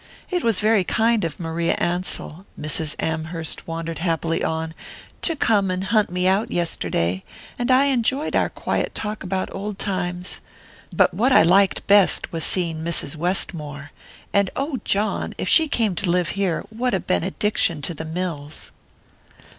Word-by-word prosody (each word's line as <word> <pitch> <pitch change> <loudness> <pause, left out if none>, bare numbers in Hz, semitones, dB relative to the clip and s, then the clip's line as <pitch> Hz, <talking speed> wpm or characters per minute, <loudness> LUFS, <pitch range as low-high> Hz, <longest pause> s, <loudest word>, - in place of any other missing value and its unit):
It 360 -1 0
was 225 -4 +2
very 215 -2 +3
kind 225 +3 +2
of 165 -3 -3
Maria 165 0 -1
Ansell," 175 0 -2
Mrs. 155 0 -2
Amherst 160 0 -2
wandered 165 -1 -4
happily 165 -1 0
on, 160 0 -2 0.5
"to 330 - +2
come 210 -8 +2
and 185 +1 -1
hunt 210 +2 +2
me 180 +1 0
out 195 +3 +2
yesterday, 95 - -1 0.4
and 245 - -1
I 260 +2 +5
enjoyed 270 +2 +1
our - - +2
quiet - - -2
talk 210 0 -4
about 190 0 -3
old 200 +1 -5
times. 180 -3 -3 0.5
But - - +3
what 235 +9 +2
I - - +7
liked 190 +4 +3
best 200 -2 +4
was 165 -2 -3
seeing 170 -4 +2
Mrs. 160 -2 -1
Westmore 155 -4 -1 0.4
and, 200 -2 +3
oh, 275 -1 -2
John, 205 +2 0
if - - -3
she 320 -1 +6
came 225 -8 +1
to 190 - 0
live 175 -1 +2
here, 195 -4 -1
what 240 0 0
a - - 0
benediction 190 -2 0
to 170 - -2
the 160 - -6
mills!" 160 -3 -4
180 Hz, 160 wpm, -22 LUFS, 165-210 Hz, 0.5 s, I